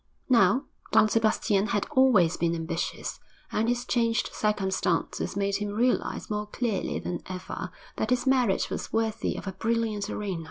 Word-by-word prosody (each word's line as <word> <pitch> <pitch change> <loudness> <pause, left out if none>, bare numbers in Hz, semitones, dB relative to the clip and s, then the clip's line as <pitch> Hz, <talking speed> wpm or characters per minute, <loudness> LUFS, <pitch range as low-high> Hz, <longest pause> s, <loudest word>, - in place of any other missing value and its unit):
Now, 240 +2 +5 0.3
Don 215 0 +6
Sebastian 215 -2 +2
had 205 -1 0
always 230 -11 +5
been 170 0 0
ambitious, 165 +1 -3 0.3
and 225 +2 +1
his 245 0 0
changed 230 -3 +1
circumstances 195 -3 0
made 200 0 +1
him 205 0 -3
realise 235 +5 0
more 210 -1 -2
clearly 220 -2 -2
than 175 - -4
ever 185 -1 -5 0.3
that - - -1
his 250 +1 +1
merit 255 -7 +2
was - - -4
worthy 225 0 0
of - - -6
a 190 - -3
brilliant 220 -1 -1
arena. 195 -5 -3
210 Hz, 155 wpm, -27 LUFS, 195-230 Hz, 0.3 s, Don